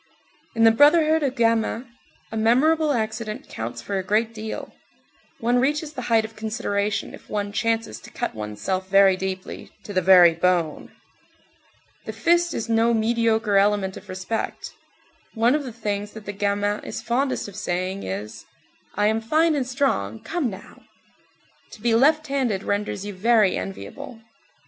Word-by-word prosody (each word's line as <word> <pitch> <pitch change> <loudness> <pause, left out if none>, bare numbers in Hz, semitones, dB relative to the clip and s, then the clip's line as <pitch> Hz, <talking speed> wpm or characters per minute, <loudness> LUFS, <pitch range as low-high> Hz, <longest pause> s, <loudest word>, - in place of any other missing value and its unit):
In 225 - +2
the 225 - +8
brotherhood 310 +5 +5
of 270 -3 -1
gamins, 230 +1 +1 0.5
a - - -5
memorable 290 +8 +3
accident 220 -3 -3
counts 120 +1 -6
for 195 +6 -2
a - - -3
great 220 +4 0
deal. 220 0 -6 0.7
One 240 0 +2
reaches 295 +3 0
the 260 - -5
height 225 -1 +3
of 220 0 -11
consideration 215 -2 -2
if - - -14
one 205 -1 -2
chances 225 +1 -1
to - - -13
cut - - -4
one's 105 -1 -7
self 185 - -2
very 195 -1 +6
deeply, 185 0 -6
"to 205 - -8
the 185 - +2
very 180 -2 +7
bone." 170 -2 0 1.1
The - - -5
fist 345 0 +2
is 230 - -3
no 230 +1 +2
mediocre 225 -2 +1
element 200 -1 +2
of - - -12
respect. 190 +4 -4 0.6
One 230 +3 +3
of 300 0 0
the 250 - -6
things 210 -2 -4
that 220 -1 -10
the 205 - -5
gamin 205 +1 -1
is 225 - -6
fondest 255 +1 -1
of 200 - -11
saying 185 -1 -3
is: 100 +3 -6 0.5
"I 205 - +1
am 220 +1 +1
fine 315 +8 +2
and 275 -4 -1
strong, 250 - -1
come 325 -7 -2
now!" 195 -1 -11 0.9
To - - -11
be 230 +2 +1
left 300 +6 +4
handed 260 -9 -1
renders 205 -1 -2
you 205 - -5
very 210 0 +3
enviable. 235 +5 -7
220 Hz, 165 wpm, -23 LUFS, 195-240 Hz, 1.1 s, the